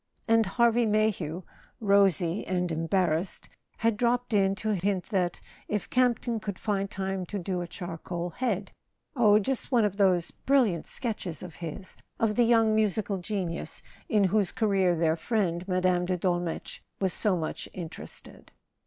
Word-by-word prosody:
And 225 -2 +4
Harvey 235 +2 +3
Mayhew, 205 -6 0 0.4
rosy 195 -4 +3
and 180 -1 0
embarrassed, 165 +1 0 0.3
had 225 -2 +1
dropped 245 +1 +1
in 195 -1 +3
to 215 +2 -3
hint 190 -1 -1
that, 180 -4 0 0.3
if 210 -2 -3
Campton 245 -2 +2
could 200 -3 -5
find 200 -2 -1
time 190 -1 -3
to 205 - -4
do 180 -1 -2
a 175 - -4
charcoal 175 0 -5
head—oh, 210 - 0
just 250 +6 -1
one 235 -4 +4
of 200 -1 -2
those 185 -4 +3
bril¬ 275 -1 +3
liant 170 -2 -6
sketches 210 -9 -4
of 180 -3 -9
his—of 185 +5 -4
the 240 +2 +3
young 225 -2 +4
musical 210 -2 +1
genius 180 -3 -3 0.3
in 210 -3 +3
whose 195 0 +2
career 195 -5 +2
their 160 -1 +2
friend 180 -2 -1
Mme. 180 -1 +2
de 180 0 0
Dolmetsch 175 -1 -2 0.2
was 190 -2 +1
so 205 -4 +1
much 160 -2 -4
interested. 170 -3 -9
195 Hz, 150 wpm, -28 LUFS, 175-215 Hz, 0.4 s, And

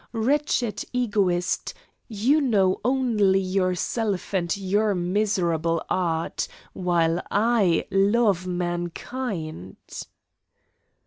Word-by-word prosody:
Wretched 245 -1 0
egoist, 205 -8 0 0.3
you 245 +8 +2
know 200 -8 +2
only 225 -6 +2
yourself 190 +2 -1
and 175 -1 0
your 200 +2 +1
miserable 175 -3 0
art, 165 -3 -1 0.3
while 170 -1 +1
I 205 -5 +2
love 195 -2 +2
mankind." 175 - -4
195 Hz, 75 wpm, -24 LUFS, 175-220 Hz, 0.3 s, you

